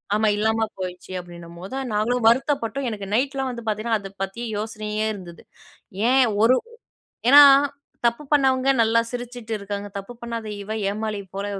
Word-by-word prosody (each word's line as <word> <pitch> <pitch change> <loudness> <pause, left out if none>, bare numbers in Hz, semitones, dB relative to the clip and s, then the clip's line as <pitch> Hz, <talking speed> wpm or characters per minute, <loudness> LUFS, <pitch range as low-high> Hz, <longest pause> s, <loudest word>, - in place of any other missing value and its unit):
ஆமா 215 +1 +2
இல்லாம 220 +1 +1
போயிடுச்சி. 185 0 -6
அப்படின்னும்போது 175 +4 -10 0.2
நாங்களும் 225 +3 0
வருத்தப்பட்டோம். 260 +1 +1
எனக்கு 205 -3 -6
நைட்லாம் 270 +1 0
வந்து 235 -1 -7
பார்த்தீங்கன்னா, 215 +1 0
அதை 195 -1 -9
பத்தி 195 +5 -5
யோசனையே 215 0 -3
இருந்தது. 180 -4 -11 0.7
"ஏன் 265 +1 +5 0.2
ஒரு 250 +3 +6 0.8
ஏன்னா 290 +1 +11 0.6
தப்பு 235 +6 0
பண்ணவங்க 265 -2 +3
நல்லா 225 +1 +3
சிரிச்சுட்டு 245 -2 -5
இருக்காங்க. 200 0 -5
தப்பு 200 +5 -9
பண்ணாத 230 -2 -5 0.2
இவ 215 +2 -5 0.2
ஏமாளி 210 0 -3 0.2
போல 200 +1 -3
220 Hz, 140 wpm, -23 LUFS, 205-245 Hz, 0.8 s, ஏன்னா